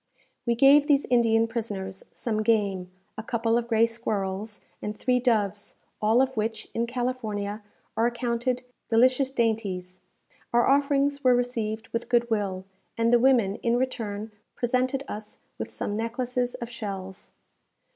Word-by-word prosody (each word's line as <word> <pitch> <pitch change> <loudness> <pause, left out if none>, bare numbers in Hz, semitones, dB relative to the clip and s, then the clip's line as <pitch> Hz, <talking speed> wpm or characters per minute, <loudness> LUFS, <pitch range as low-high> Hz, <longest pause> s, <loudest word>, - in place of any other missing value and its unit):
We 235 - +3
gave 280 +4 +6
these 285 -2 +4
Indian 230 -2 +4
prisoners 205 -5 -5
some 215 -3 -2
game, 200 -5 +1 0.3
a - - -5
couple 230 0 0
of 235 0 0
gray 225 -1 +4
squirrels, 210 -2 -3 0.2
and 210 0 -4
three 250 +2 +2
doves, 210 -5 0 0.3
all 220 +4 +4
of 265 0 -3
which, 220 0 -2
in 235 +1 0
California, 225 -4 -3 0.3
are 225 +2 +3
accounted 240 +1 -1 0.2
delicious 255 +3 +4
dainties. 205 -7 -1 0.5
Our 240 0 +4
offerings 280 +1 +2
were 250 -1 +6
received 225 -3 -2
with 230 - -3
good 240 -1 +2
will, 195 -3 -1 0.3
and 230 +1 +2
the 240 - +7
women, 235 -6 +3
in 235 0 +1
return, 220 -4 -3 0.2
presented 255 +2 0
us 210 0 -7 0.2
with - - -4
some 205 - -4
necklaces 245 +2 -2
of 235 - -5
shells. 195 -5 -6
230 Hz, 145 wpm, -26 LUFS, 210-250 Hz, 0.5 s, the